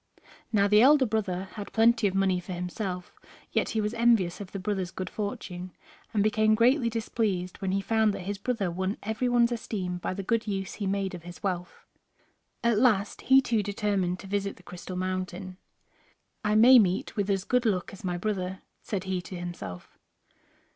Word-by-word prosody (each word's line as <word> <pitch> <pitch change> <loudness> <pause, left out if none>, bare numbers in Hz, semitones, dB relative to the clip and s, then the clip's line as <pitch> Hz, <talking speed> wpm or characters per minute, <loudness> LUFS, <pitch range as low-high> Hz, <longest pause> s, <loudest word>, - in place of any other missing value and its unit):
Now 200 -2 +3
the 210 +1 +6
elder 275 +1 +6
brother 195 -4 -2
had 205 -2 -7
plenty 225 -1 +4
of 190 - -3
money 190 -2 +2
for 180 +1 -7
himself, 180 +1 -4 0.4
yet - - +1
he 220 - 0
was 210 +1 -1
envious 230 -7 +2
of 195 - -8
the - - -4
brother's 190 -1 -2
good 185 +1 -6
fortune, 185 -3 -5 0.4
and 205 -2 +2
became 215 0 +3
greatly 240 +2 +3
displeased 215 -5 -2
when 190 -1 -1
he 195 +1 +1
found 220 +1 +2
that - - -6
his 200 +1 -4
brother 210 -5 -1
won 190 +4 -2
every 220 +4 -1
one's 240 0 +4
esteem 185 -6 -3
by 185 - -3
the 195 - -4
good 230 +2 0
use 195 -2 -3
he 200 - -3
made 195 -1 -1
of 175 - -7
his 175 +1 -11
wealth. 180 -3 -4 0.8
At 235 -3 +3
last, 220 -5 +2
he 265 +1 +6
too 230 -4 +1
determined 200 -3 -1
to - - -11
visit 200 0 -2
the 180 - -19
Crystal 180 +1 -8
Mountain. 185 0 -4 0.9
"I 210 0 +1
may 245 +4 +9
meet 190 +1 +1
with 205 -2 -1
as 195 -1 +1
good 250 +2 +1
luck 185 -4 -1
as 195 - -11
my 180 -2 -1
brother," 185 -1 -3 0.2
said 195 -4 -3
he 190 -1 -2
to 185 - -9
himself. 175 - -7
200 Hz, 190 wpm, -28 LUFS, 185-220 Hz, 0.9 s, may